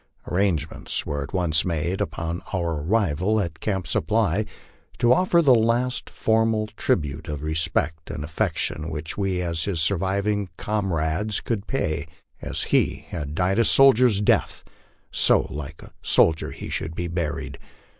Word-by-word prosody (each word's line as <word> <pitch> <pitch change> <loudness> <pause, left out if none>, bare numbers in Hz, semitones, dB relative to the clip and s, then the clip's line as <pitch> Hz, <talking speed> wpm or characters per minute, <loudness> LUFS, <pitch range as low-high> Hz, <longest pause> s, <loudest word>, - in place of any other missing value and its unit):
Arrangements 90 -5 -1
were 75 0 -3
at 70 - -6
once 85 -5 +2
made, 85 +2 -1
upon 85 +1 -3
our 85 -5 -1
arrival 100 +2 +1
at 85 -5 -3
Camp 95 -4 -2
Supply, 105 +4 +1 0.5
to 120 +1 +5
offer 170 +2 +3
the 135 -4 +6
last 120 +2 +1
formal 110 -1 +1
tribute 75 -6 -1
of 75 -1 -5
respect 80 0 -1
and 75 -2 -5
affection 80 0 -2
which 80 0 -5
we 95 -3 -1
as 85 -2 -2
his 95 -5 -1
surviving 100 +3 0
comrades 100 -1 -1
could 110 -3 -3
pay. 80 - -1 0.3
As - - -3
he - - +1
had 75 -2 -5
died 95 +4 +1
a - - +5
soldier's 125 -4 +5
death, 105 - +1 0.5
so - - +4
like 75 +2 -7
a - - -15
soldier 80 -1 +3
he - - -8
should 80 +1 -3
be 85 0 -2
buried. 85 -2 -3
90 Hz, 145 wpm, -24 LUFS, 80-105 Hz, 0.5 s, the